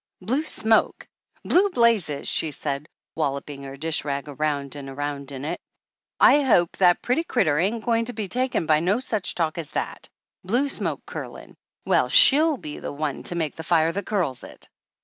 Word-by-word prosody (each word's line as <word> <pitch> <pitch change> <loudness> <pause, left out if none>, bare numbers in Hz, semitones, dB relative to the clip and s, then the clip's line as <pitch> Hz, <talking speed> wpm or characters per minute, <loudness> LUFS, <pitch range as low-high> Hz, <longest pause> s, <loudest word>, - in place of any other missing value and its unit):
"Blue 250 +11 -1
smoke! 220 -6 +1 0.4
Blue 395 +3 +3
blazes!' 230 - +1
she 160 - +1
said, 145 0 -4 0.2
wal 150 -4 0
loping 140 0 -8
her 135 0 -8
dish 160 +2 -1
rag 140 0 -3
around 145 -1 -2
and 140 -1 -8
around 140 0 -5
in 135 0 -6
it. - - -4 0.6
"I 285 +3 +6
hope 195 -11 +2
that 180 -2 +4
pretty 255 +7 +1
critter 170 - +1
ain't 215 +6 -1
goin' 230 -1 +1
to 245 - -3
be 210 -2 -4
took 255 +5 -2
in 165 - +1
by 155 -1 +3
no 190 +8 +1
such 215 -7 -1
talk 170 0 -1
as 155 - -5
that! - - -5 0.3
Blue 245 +10 0
smoke - - -2
curlin'! - - -9 0.3
Well, - - +2
she'll 305 +1 +6
be 150 -9 -8
the - - -6
one 145 -1 -3
to 175 - -3
make 160 -4 -2
the - - -7
fire 165 0 +2
that 200 +4 -5
curls 165 - -1
it!" - - -13
170 Hz, 190 wpm, -24 LUFS, 145-230 Hz, 0.6 s, I